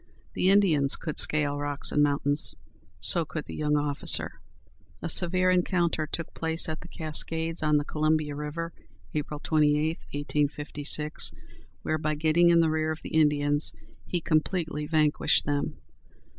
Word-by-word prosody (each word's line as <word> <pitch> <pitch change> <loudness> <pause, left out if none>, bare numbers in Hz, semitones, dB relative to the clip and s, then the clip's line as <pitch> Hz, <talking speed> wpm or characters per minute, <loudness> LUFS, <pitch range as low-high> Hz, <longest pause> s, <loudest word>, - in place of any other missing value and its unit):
The 185 - +1
Indians 165 -9 +3
could 155 - -4
scale 145 -2 +3
rocks 145 0 -1
and 150 - +2
mountains; 145 0 +1 0.4
so 100 - +5
could 155 0 -6
the - - -9
young 150 -1 0
officer. 145 -1 +1 0.6
A - - -5
severe 185 +2 +4
encounter 175 -3 0
took 165 +2 -4
place 160 0 0
at 155 -1 -5
the 175 - -11
Cascades, 160 +1 -1
on 150 -1 +2
the 145 - -2
Columbia 155 -1 0
River, 150 +3 -5 0.4
April 150 0 -4
28, 155 +1 +1
1856, 145 +1 -1 0.5
where, 155 - -1
by 155 0 -1
getting 160 +3 +3
in 170 -1 +5
the 160 -1 +1
rear 155 0 -1
of 160 - -7
the - - -8
Indians, 145 -1 +2 0.3
he 175 - -2
completely 155 -1 -1
vanquished 155 -2 +2
them. 145 -1 -2
155 Hz, 145 wpm, -27 LUFS, 145-165 Hz, 0.6 s, so